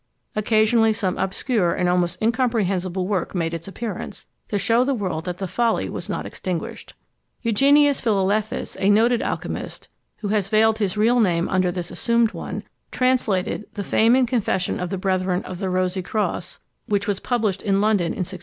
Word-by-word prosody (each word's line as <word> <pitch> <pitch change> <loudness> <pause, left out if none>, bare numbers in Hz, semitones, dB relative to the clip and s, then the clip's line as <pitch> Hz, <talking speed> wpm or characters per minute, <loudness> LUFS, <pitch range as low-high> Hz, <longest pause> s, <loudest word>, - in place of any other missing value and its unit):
Occasionally 220 +1 +3
some 195 -3 -1
obscure 190 -1 0
and 180 - 0
almost 180 0 +1
incomprehensible 195 -7 0
work 195 -2 -2
made 165 -2 -1
its 165 +1 -5
appearance, 200 -1 -6 0.2
to 205 - -1
shew 230 +5 +3
the 270 +1 0
world 180 -7 -3
that 180 -1 -4
the 195 - -3
folly 230 +5 0
was - - -6
not - - -3
extinguished. 180 -3 -5 0.5
Eugenius 280 +5 +4
Philalethes, 210 -1 0
a 195 - +2
noted 230 +3 +4
alchymist, - - -4 0.3
who 205 - -3
has 205 -2 0
veiled 220 +1 +3
his 205 -1 -1
real 235 +4 +3
name 175 -6 +2
under 185 -1 +2
this 175 -1 -5
assumed 235 -1 +2
one, - - -6 0.3
translated 225 -6 0
The 205 - -3
Fame 225 +5 +4
and 260 -1 +3
Confession 215 -7 0
of 180 - -3
the 195 - -2
Brethren 185 0 0
of 185 -1 -7
the 195 -2 -2
Rosie 185 0 0
Cross, 185 -2 -3 0.3
which 200 -1 0
was 200 -2 0
published 215 -6 -1
in 195 -1 +1
London 205 -3 +2
in 170 - -3
1652. - - -8
200 Hz, 175 wpm, -22 LUFS, 185-225 Hz, 0.5 s, Eugenius